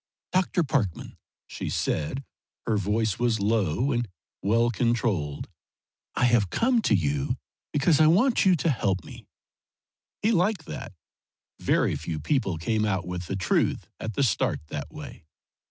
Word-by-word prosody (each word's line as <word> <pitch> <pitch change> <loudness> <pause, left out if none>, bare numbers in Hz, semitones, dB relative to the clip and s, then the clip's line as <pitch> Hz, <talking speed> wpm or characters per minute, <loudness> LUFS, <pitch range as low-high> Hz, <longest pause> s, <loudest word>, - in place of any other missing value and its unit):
"Dr. 185 -1 +2
Parkman," 130 - -1 0.3
she - - -5
said 80 - -1 0.4
her 115 - +1
voice 105 +1 0
was 120 -2 +2
low 105 - +1
and 120 -2 0 0.3
well 115 +3 +2
controlled 110 - 0 0.7
"I 125 - +3
have 120 -6 +3
come 235 - +2
to 110 - +3
you 70 -6 0 0.3
because 145 +2 +3
I 155 - +7
want 230 - +4
you 190 -3 +5
to 165 0 +1
help 95 -7 0
me." - - -12 1.0
He 220 - +4
liked 185 -3 +1
that. - - -7 0.7
Very - - +2
few 80 0 -4
people 95 - 0
came 110 +7 0
out 95 -4 0
with 90 -1 -5
the 100 - -2
truth 95 - 0
at 110 -2 -5
the 140 - +2
start 115 -9 +1
that 75 - -5
way. 80 - -10
115 Hz, 150 wpm, -26 LUFS, 95-145 Hz, 1.0 s, I